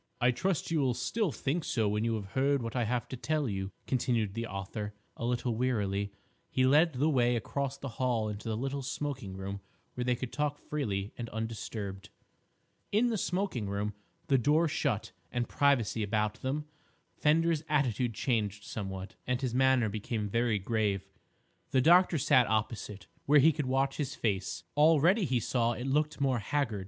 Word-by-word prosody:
"I 125 Hz, 0 st, +4 dB
trust 175 Hz, +5 st, -1 dB
you 165 Hz, -, +2 dB
will 130 Hz, -4 st, +2 dB
still 215 Hz, -, 0 dB
think 150 Hz, +5 st, -1 dB
so 110 Hz, -6 st, 0 dB
when 105 Hz, +1 st, 0 dB
you 115 Hz, -1 st, +1 dB
have 100 Hz, -3 st, -6 dB
heard 135 Hz, 0 st, +2 dB
what 115 Hz, +1 st, -5 dB
I 120 Hz, -2 st, +1 dB
have 120 Hz, 0 st, -1 dB
to -, -, -4 dB
tell 150 Hz, +3 st, -1 dB
you," 95 Hz, -2 st, -3 dB
continued 115 Hz, -5 st, 0 dB
the 115 Hz, +1 st, -3 dB
author, 105 Hz, +1 st, -5 dB, 0.2 s
a -, -, -4 dB
little 120 Hz, 0 st, 0 dB
wearily. 100 Hz, -5 st, 0 dB, 0.4 s
He 130 Hz, -, +2 dB
led 150 Hz, +5 st, +5 dB
the 135 Hz, +4 st, +1 dB
way 125 Hz, -5 st, +3 dB
across 140 Hz, +4 st, -2 dB
the 140 Hz, -, -6 dB
hall 120 Hz, -4 st, +1 dB
into 105 Hz, +1 st, -5 dB
the 110 Hz, -, -1 dB
little 135 Hz, +3 st, -2 dB
smoking 130 Hz, -7 st, -4 dB
room 100 Hz, +1 st, -5 dB, 0.3 s
where 125 Hz, -, -3 dB
they 125 Hz, 0 st, +2 dB
could 125 Hz, 0 st, -6 dB
talk 150 Hz, -1 st, -1 dB
freely 105 Hz, -12 st, -3 dB
and 115 Hz, -1 st, -4 dB
undisturbed. 105 Hz, -3 st, -5 dB, 0.8 s
In 225 Hz, +4 st, +3 dB
the 230 Hz, -, 0 dB
smoking 180 Hz, -, -1 dB
room, 100 Hz, +1 st, -2 dB, 0.3 s
the 135 Hz, -4 st, +3 dB
door 150 Hz, +7 st, +3 dB
shut 105 Hz, -8 st, -1 dB, 0.2 s
and 120 Hz, -1 st, -1 dB
privacy 130 Hz, -6 st, +2 dB
about 105 Hz, +1 st, -1 dB
them, 145 Hz, +3 st, -2 dB, 0.5 s
Fender's 160 Hz, +1 st, +3 dB
attitude 125 Hz, -6 st, +1 dB
changed 105 Hz, -4 st, -1 dB
somewhat, 95 Hz, -2 st, -5 dB
and 125 Hz, -1 st, +1 dB
his 130 Hz, -3 st, -2 dB
manner 130 Hz, -2 st, +4 dB
became 105 Hz, +1 st, -3 dB
very 115 Hz, +1 st, +1 dB
grave. 100 Hz, -1 st, 0 dB, 0.6 s
The 130 Hz, -, +3 dB
doctor 175 Hz, +4 st, +6 dB
sat 125 Hz, -3 st, +4 dB
opposite, 105 Hz, -2 st, -2 dB, 0.2 s
where 150 Hz, +2 st, +6 dB
he 150 Hz, +3 st, +7 dB
could 150 Hz, -3 st, -2 dB
watch 135 Hz, +1 st, +1 dB
his 140 Hz, -3 st, -2 dB
face. 95 Hz, -4 st, -1 dB
Already, 165 Hz, +7 st, +5 dB
he 130 Hz, -4 st, +1 dB
saw, 120 Hz, +1 st, +1 dB
it 125 Hz, +2 st, -5 dB
looked 150 Hz, +2 st, +1 dB
more 135 Hz, -3 st, +2 dB
haggard. 115 Hz, -2 st, -1 dB
125 Hz, 180 wpm, -31 LUFS, 105-140 Hz, 0.8 s, he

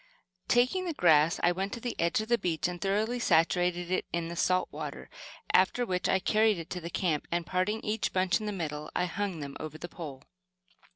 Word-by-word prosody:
Taking 255 Hz, +10 st, +2 dB
the 335 Hz, -3 st, -3 dB
grass 160 Hz, -, +4 dB
I 175 Hz, -, +5 dB
went 190 Hz, +3 st, -3 dB
to -, -, -4 dB
the 240 Hz, 0 st, -4 dB
edge 170 Hz, +5 st, +2 dB
of 220 Hz, -, -6 dB
the 235 Hz, 0 st, +2 dB
beach 175 Hz, -3 st, 0 dB
and 175 Hz, -1 st, -6 dB
thoroughly 215 Hz, +5 st, 0 dB
saturated 175 Hz, -2 st, +2 dB
it 185 Hz, -, 0 dB
in 170 Hz, -1 st, -2 dB
the 170 Hz, -, -5 dB
salt 185 Hz, +1 st, +2 dB
water -, -, -7 dB, 0.4 s
after 245 Hz, -, +4 dB
which 180 Hz, -4 st, -1 dB
I -, -, +4 dB
carried 215 Hz, +2 st, +3 dB
it 165 Hz, -1 st, -8 dB
to 180 Hz, -, -4 dB
the 170 Hz, -, -5 dB
camp, 165 Hz, -3 st, -1 dB
and 170 Hz, 0 st, 0 dB
parting 185 Hz, +6 st, 0 dB
each 215 Hz, +1 st, -1 dB
bunch 185 Hz, -1 st, +2 dB
in 215 Hz, -, -5 dB
the -, -, -1 dB
middle, 150 Hz, -5 st, -4 dB
I 180 Hz, -, +2 dB
hung 185 Hz, -2 st, -3 dB
them 140 Hz, -1 st, -6 dB
over 155 Hz, 0 st, -6 dB
the 170 Hz, -, -6 dB
pole. 145 Hz, -6 st, -8 dB
180 Hz, 220 wpm, -30 LUFS, 170-210 Hz, 0.4 s, I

